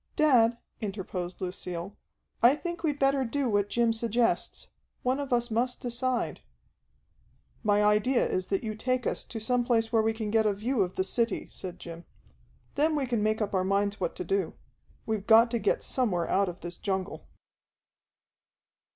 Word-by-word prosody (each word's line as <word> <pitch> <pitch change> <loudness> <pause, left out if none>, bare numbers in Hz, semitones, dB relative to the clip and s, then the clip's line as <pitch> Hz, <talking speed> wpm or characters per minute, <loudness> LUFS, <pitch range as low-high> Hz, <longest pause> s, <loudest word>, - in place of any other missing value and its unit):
"Dad," 245 -7 +4 0.2
interposed 190 -4 -5
Lucille, 180 +1 -5 0.5
"I 245 +4 +7
think 345 +2 -5
we'd 300 -4 0
better 275 -1 +2
do 265 +2 -1
what 205 -2 +1
Jim 235 0 +2
suggests. 230 +1 0 0.3
One 255 +2 +1
of 280 -2 -4
us 240 -1 +1
must 245 +3 0
decide." 245 0 -1 1.2
"My 210 -2 +3
idea 210 +5 +3
is 185 0 -2
that 195 +2 -1
you 215 -1 -3
take 255 +3 -1
us - - -1
to 225 - -6
some 245 +3 +1
place 230 -1 +1
where 225 - +5
we 225 0 +1
can 220 -2 -4
get 220 -1 +3
a 205 - +2
view 225 +4 -1
of 185 -1 -1
the 185 - +1
city," 230 +4 0
said 180 -2 -7
Jim. 170 0 -9 0.7
"Then 310 +2 +2
we 285 -2 0
can 240 -4 -1
make 215 +1 +1
up 205 - -4
our 185 -1 +2
minds 200 +2 0
what - - -2
to - - -4
do. 395 0 -1 0.5
We've 215 -3 -2
got 230 +1 +7
to 235 - 0
get - - +1
somewhere 200 -10 0
out 195 -1 +2
of 175 +1 -9
this 175 0 -7
jungle." 190 -1 -3
225 Hz, 175 wpm, -28 LUFS, 200-250 Hz, 1.2 s, I